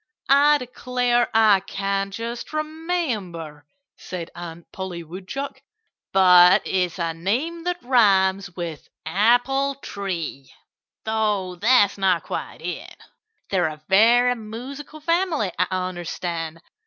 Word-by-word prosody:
"I 290 +2 +6
declare, 250 -1 0
I 215 -3 +5
can't 195 +1 -2
just 230 +6 -6
remember," 250 - -3 0.3
said 175 -3 -7
Aunt 170 -1 -9
Polly 185 -3 -6
Woodchuck. 265 - -7 0.5
"But 180 -1 +7
it's 180 -2 -1
a 165 -2 -1
name 260 - -2
that 355 -5 -2
rhymes 195 -6 +3
with 170 -4 -6 0.2
apple 245 - +2
tree 180 - -5 0.5
though 210 -4 0
that's 205 0 +3
not 185 -3 +2
quite - - -6
it.... - - -6 0.5
They're 180 -4 +2
a 155 -1 -8
very 235 +5 +5
musical 255 +7 -8
family, 335 - 0
I 180 - +3
understand. 175 -3 -4
200 Hz, 110 wpm, -23 LUFS, 180-250 Hz, 0.5 s, But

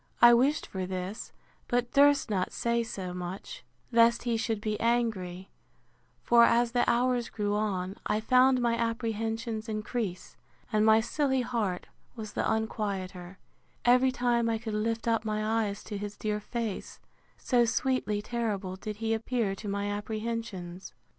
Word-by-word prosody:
I 240 0 +9
wished 265 +6 +3
for 185 -1 -4
this, 185 +3 -5 0.4
but 245 0 0
durst 285 0 +5
not 190 -4 -1
say 235 0 0
so 190 -5 -5
much, 180 - -6 0.3
lest 235 0 +4
he 240 -1 0
should 225 -1 -1
be 215 0 -2
angry; 215 -6 -1 0.7
for, 235 0 +6
as 235 0 +4
the 245 0 +2
hours 245 0 +1
grew 205 -1 -2
on, 195 -3 -1
I 210 - +1
found 255 +3 +4
my 235 -1 +2
apprehensions 225 -1 -2
increase, 215 -3 -4 0.4
and 215 0 +3
my 220 0 +6
silly 265 +2 0
heart 225 -7 -2 0.3
was 220 -3 -7
the - - -1
unquieter, 195 -4 -3 0.5
every 250 +2 +5
time 240 -2 +1
I 225 - +1
could 220 -1 -5
lift 225 +2 -1
up 225 -1 +2
my 215 0 0
eyes 200 0 -6
to 205 -2 -5
his 205 0 -6
dear 210 -1 -2
face; 225 -1 -5 0.4
so 245 -2 +2
sweetly 225 -4 0
terrible 210 -6 -3
did 210 +2 -5
he 225 +1 -1
appear 225 -2 -1
to 205 +2 -8
my 200 0 -2
apprehensions. 205 -3 -4
220 Hz, 155 wpm, -29 LUFS, 205-235 Hz, 0.7 s, I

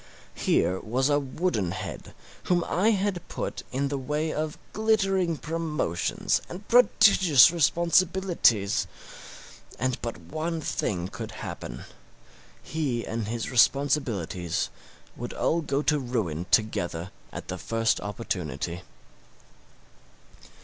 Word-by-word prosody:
Here 95 +1 +1
was 130 +5 0
a 145 0 +3
wooden 135 - -1
head 95 -5 -7 0.3
whom 175 -1 +2
I 190 +7 +2
had 200 -4 0
put - - -4
in 140 +2 -1
the 140 -1 -2
way 150 +4 -1
of 155 0 -3 0.2
glittering 195 -6 +2
promotions 155 - -1
and 185 +4 -8
prodigious 200 - +6
responsibilities, 170 - +2 0.9
and 130 +1 -1
but 115 -1 -4
one 155 - -4
thing 90 - -2
could - - -7
happen: - - -7 0.8
he 140 -7 -2
and 110 -2 -3
his 115 +2 -3
responsibilities 120 - +1 0.4
would - - -6
all 170 - +1
go 145 -1 -1
to 150 -1 +2
ruin 105 - -2
together 95 -5 +1 0.2
at - - -8
the - - -4
first 115 0 0
opportunity. 90 - -4
140 Hz, 110 wpm, -27 LUFS, 105-170 Hz, 0.9 s, prodigious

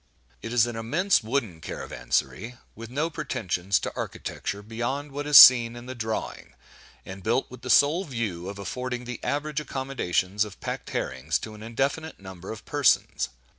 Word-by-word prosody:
It 115 - -6
is 120 -2 +4
an 120 -1 -5
immense 155 - +2
wooden 110 -8 -2
caravanserai, 65 - -3 0.2
with 115 0 -9
no 150 +6 -1
pretensions 100 - -1
to - - -5
architecture 100 0 -5
beyond 120 +7 -4
what 145 +1 -5
is 150 - +8
seen 120 -2 +10
in 120 0 -9
the 130 - -6
drawing, 110 -3 -5 0.5
and 95 +1 -8
built 120 +7 0
with 125 -1 -11
the 125 - -7
sole 145 +9 +5
view 105 - -4
of 100 - -7
affording 125 +6 -4
the 125 0 -6
average 150 +1 -1
accommodations 110 -9 -1
of 105 -3 -9
packed - - -5
herrings 70 +5 -2
to 110 - -8
an 105 - -12
indefinite 135 +8 -2
number 95 -1 -10
of 110 0 -9
persons. 145 -4 +2
115 Hz, 170 wpm, -26 LUFS, 100-135 Hz, 0.5 s, seen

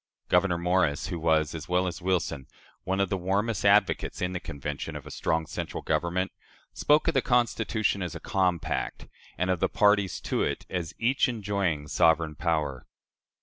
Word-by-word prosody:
" - - -50
Gouverneur 90 -3 +3
Morris, 90 -2 +1
who 85 -3 -3
was, 80 -1 +2
as 80 0 -7
well 90 +1 +2
as 90 0 -4
Wilson, 90 -7 -1 0.4
one 95 +1 0
of 100 -2 +1
the 95 - 0
warmest 100 +4 -1
advocates 100 -1 +3
in 90 0 -1
the 90 - -2
Convention 70 -2 -5
of - - -7
a - - -9
strong 80 0 0
central - - -5
government, 90 +2 0 0.4
spoke 150 +1 +3
of 165 - +3
the 135 - +3
Constitution 115 -4 +1
as 90 -3 -4
"a - - -5
compact," 90 -3 -1 0.3
and 90 +1 +1
of 90 - 0
the - - +1
parties 100 -2 +3
to - - -1
it - - -1
as 85 -4 -3
"each 130 +3 +2
enjoying 100 -9 -1
sovereign 80 0 +3
power." 75 -4 -2
90 Hz, 180 wpm, -27 LUFS, 80-100 Hz, 0.4 s, Gouverneur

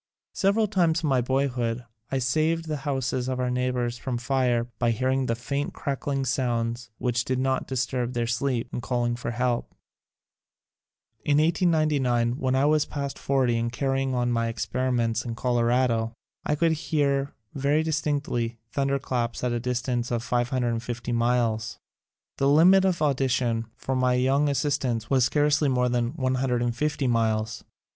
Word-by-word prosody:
Several 205 +3 +2
times 170 -5 +1
in 155 - +1
my 130 -2 +3
boyhood 125 -2 -1 0.3
I 135 - +1
saved 155 +6 +1
the 155 -1 -2
houses 130 -2 -1
of 130 -1 -2
our 125 0 0
neighbors 125 -1 -1
from 130 -3 -3
fire 125 -1 +1 0.2
by 120 - +2
hearing 130 +3 0
the 115 - 0
faint 140 +4 -3
crackling 140 0 -2
sounds 120 -2 -1
which 120 -2 0
did 130 +1 -1
not 130 0 0
disturb 125 -1 -1
their 120 -1 0
sleep, 120 0 -1
and - - -3
calling 120 +1 0
for 120 -1 -4
help. 120 0 -1 1.5
In 145 -1 +2
1899, 150 -8 +2
when 130 0 +1
I 135 +2 +3
was 150 0 +3
past 140 -1 -4
forty 130 -4 +1
and 115 0 -1
carry 135 +2 0
ing 135 -1 -1
on 120 0 +1
my 115 -1 +1
experiments 120 -1 -1
in 115 -2 -4
Colorado, 120 -1 +1 0.3
I 150 - +2
could 165 +2 +2
hear 140 -3 0 0.2
very 145 +3 +1
distinctly 145 -7 -1
thunderclaps 135 -4 -1
at 125 - +1
a 120 - -1
dis 125 0 -2
tance 120 -2 -1
of 120 -1 -1
550 120 -1 -1
miles. 115 -2 0 0.6
The 135 - +2
limit 180 +6 +6
of 180 -4 +1
audition 125 -5 +1
for 130 - -3
my 130 -1 +2
young 135 +3 +2
assistants 135 -5 -1
was 130 -3 +4
scarcely 145 +1 +2
more 125 -1 +2
than 120 +1 0
150 130 0 0
miles. 115 -1 0
125 Hz, 155 wpm, -26 LUFS, 120-140 Hz, 1.5 s, limit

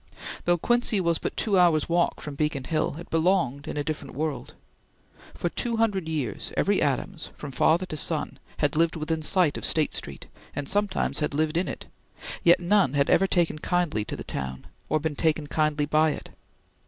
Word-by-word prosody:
Though 175 0 +3
Quincy 240 +2 +1
was 170 -3 +1
but - - -4
two 200 -4 +2
hours' 165 -4 +4
walk 170 0 +1
from 150 - -6
Beacon 150 -2 -1
Hill, 155 +1 -1
it 170 - -10
belonged 160 -5 +1
in - - -4
a 145 - 0
different 145 -3 -5
world. 150 -1 -3 0.8
For - - -2
two 230 +6 -2
hundred 200 -7 0
years, 140 -10 -3
every 200 0 +2
Adams, 160 +5 -1
from 145 - -7
father 165 +7 +3
to 155 - -6
son, 155 0 -1 0.2
had 145 -1 0
lived 165 +1 +2
within 160 0 -2
sight 170 -1 +2
of - - -11
State 155 -2 +3
Street, 70 -1 -5 0.3
and 145 -1 -3
sometimes 205 +1 0
had 150 -2 -1
lived 155 +1 0
in 175 +3 +1
it, - - -6 0.6
yet 170 0 +6
none 180 -5 +3
had 140 -1 +2
ever 195 - +4
taken 170 -4 +1
kindly 175 - 0
to - - -5
the - - -7
town, 65 -1 -5 0.2
or 155 - +2
been 155 0 -2
taken 155 0 +1
kindly 150 0 0
by 155 +1 +3
it. - - -9
160 Hz, 190 wpm, -26 LUFS, 145-175 Hz, 0.8 s, yet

